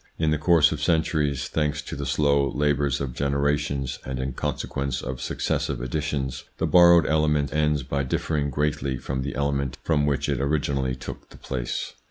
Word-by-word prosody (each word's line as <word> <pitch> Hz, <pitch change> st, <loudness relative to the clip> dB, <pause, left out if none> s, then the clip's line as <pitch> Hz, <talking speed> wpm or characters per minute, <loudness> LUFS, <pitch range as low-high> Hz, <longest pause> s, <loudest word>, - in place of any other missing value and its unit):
In 80 Hz, -1 st, +1 dB
the 75 Hz, -, +1 dB
course 80 Hz, -2 st, +5 dB
of -, -, -3 dB
centuries, 75 Hz, -4 st, +1 dB
thanks 75 Hz, -1 st, -1 dB
to -, -, -6 dB
the 70 Hz, -1 st, -4 dB
slow 70 Hz, 0 st, +2 dB
labours 70 Hz, -2 st, +1 dB
of 65 Hz, -3 st, -3 dB
generations 70 Hz, -1 st, -1 dB
and 65 Hz, -1 st, -4 dB
in 65 Hz, 0 st, -3 dB
consequence 70 Hz, +1 st, -3 dB
of 65 Hz, 0 st, -5 dB
successive -, -, -1 dB
additions, 65 Hz, +1 st, -3 dB
the -, -, 0 dB
borrowed 85 Hz, -2 st, +7 dB
element 75 Hz, -3 st, +1 dB
ends 75 Hz, -2 st, +1 dB
by 70 Hz, +2 st, -2 dB
differing 70 Hz, +2 st, -1 dB
greatly 70 Hz, -2 st, -1 dB
from 65 Hz, +1 st, -3 dB
the 70 Hz, 0 st, -4 dB
element 70 Hz, -1 st, -1 dB
of 75 Hz, -3 st, +3 dB
which 70 Hz, -1 st, 0 dB
it 70 Hz, -2 st, 0 dB
originally 70 Hz, -2 st, 0 dB
took 65 Hz, -, -9 dB
the -, -, -14 dB
place. 60 Hz, -3 st, -4 dB
70 Hz, 175 wpm, -25 LUFS, 65-75 Hz, -, borrowed